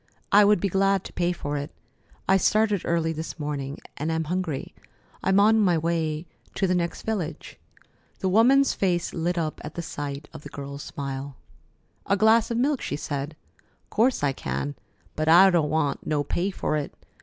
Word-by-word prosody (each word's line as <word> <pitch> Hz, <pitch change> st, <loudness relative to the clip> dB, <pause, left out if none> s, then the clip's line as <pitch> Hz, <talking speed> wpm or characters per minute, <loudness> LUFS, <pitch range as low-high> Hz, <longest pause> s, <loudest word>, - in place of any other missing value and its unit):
"I 205 Hz, +1 st, +7 dB
would 210 Hz, -1 st, +4 dB
be 200 Hz, -, 0 dB
glad 195 Hz, 0 st, +2 dB
to -, -, -10 dB
pay 175 Hz, 0 st, +1 dB
for 145 Hz, -4 st, -3 dB
it. 145 Hz, +1 st, -4 dB, 0.6 s
I 190 Hz, -, +5 dB
started 210 Hz, 0 st, +2 dB
early 165 Hz, -1 st, +1 dB
this 160 Hz, +2 st, -6 dB
morning, 145 Hz, -2 st, -4 dB, 0.2 s
and 155 Hz, +3 st, -2 dB
am 160 Hz, 0 st, 0 dB
hungry. 165 Hz, -3 st, -3 dB, 0.5 s
I'm 190 Hz, +1 st, +3 dB
on 220 Hz, +2 st, +5 dB
my 180 Hz, -5 st, +3 dB
way 160 Hz, -1 st, -1 dB, 0.3 s
to 195 Hz, -, +1 dB
the 185 Hz, -, +1 dB
next 170 Hz, -1 st, -2 dB
village." 175 Hz, -8 st, -4 dB, 0.6 s
The 190 Hz, -, -2 dB
woman's 250 Hz, +8 st, +5 dB
face 180 Hz, -3 st, 0 dB
lit 175 Hz, +2 st, -1 dB
up 155 Hz, -2 st, -2 dB
at -, -, -8 dB
the 170 Hz, -, -4 dB
sight 145 Hz, -2 st, -5 dB
of -, -, -9 dB
the -, -, -10 dB
girl's 140 Hz, 0 st, -7 dB
smile. 140 Hz, -1 st, -6 dB, 0.7 s
"A 200 Hz, -, +2 dB
glass 220 Hz, +2 st, +4 dB
of 235 Hz, -, -1 dB
milk?" 275 Hz, +2 st, +1 dB
she -, -, -3 dB
said. 145 Hz, +1 st, -4 dB, 0.6 s
"'Course 240 Hz, -, +2 dB
I 140 Hz, -1 st, +2 dB
can, 145 Hz, +1 st, -3 dB, 0.4 s
but 155 Hz, 0 st, -1 dB
I 180 Hz, +4 st, +8 dB
don't 160 Hz, -4 st, +2 dB
want 145 Hz, -3 st, -1 dB
no 150 Hz, -2 st, +1 dB
pay 175 Hz, +6 st, -1 dB
for 185 Hz, -5 st, -2 dB
it. 145 Hz, -, -5 dB
170 Hz, 185 wpm, -25 LUFS, 150-195 Hz, 0.7 s, I